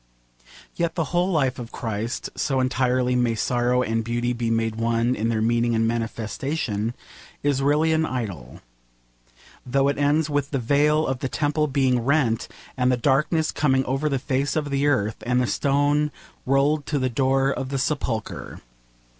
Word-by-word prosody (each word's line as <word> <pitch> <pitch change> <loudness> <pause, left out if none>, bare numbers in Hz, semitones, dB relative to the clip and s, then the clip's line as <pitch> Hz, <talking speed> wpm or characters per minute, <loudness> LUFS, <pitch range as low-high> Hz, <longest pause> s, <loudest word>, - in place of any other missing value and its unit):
Yet 170 -1 -1
the 165 - +1
whole 175 +2 +2
life 135 -6 +1
of 120 -1 -7
Christ 115 +1 -4
so 135 -2 0
entirely 125 -1 +1
may 120 -2 +1
sorrow 125 +2 +1
and 115 -1 -1
beauty 120 +2 -1
be 120 -1 -2
made 115 -1 0
one 115 +1 +1
in 115 -1 -1
their 110 -1 0
meaning 120 0 +2
and 115 0 +2
manifestation 115 0 -2 0.5
is 140 -2 +1
really 150 +3 +3
an 160 0 +2
idyll, 100 - -5 1.0
though 135 +2 +1
it 140 - -2
ends 145 +2 +2
with 145 -2 -1
the 140 - -1
veil 145 +5 +2
of 130 -1 -2
the 135 - -3
temple 150 +2 0
being 130 -3 +2
rent, 125 -4 +1 0.3
and 125 0 +2
the 125 - +2
darkness 150 +5 +1
coming 135 -3 +1
over 135 +4 0
the 135 - 0
face 135 +2 -1
of 150 -2 -1
the 140 +1 +1
earth, 110 -6 +1
and 125 +1 +1
the 125 - +2
stone 145 +3 +1 0.4
rolled 140 +2 +2
to 150 - 0
the 130 -2 +1
door 135 +2 +1
of 135 -1 -3
the 135 - -2
sepulchre. 125 -5 -3
130 Hz, 170 wpm, -24 LUFS, 120-145 Hz, 1.0 s, really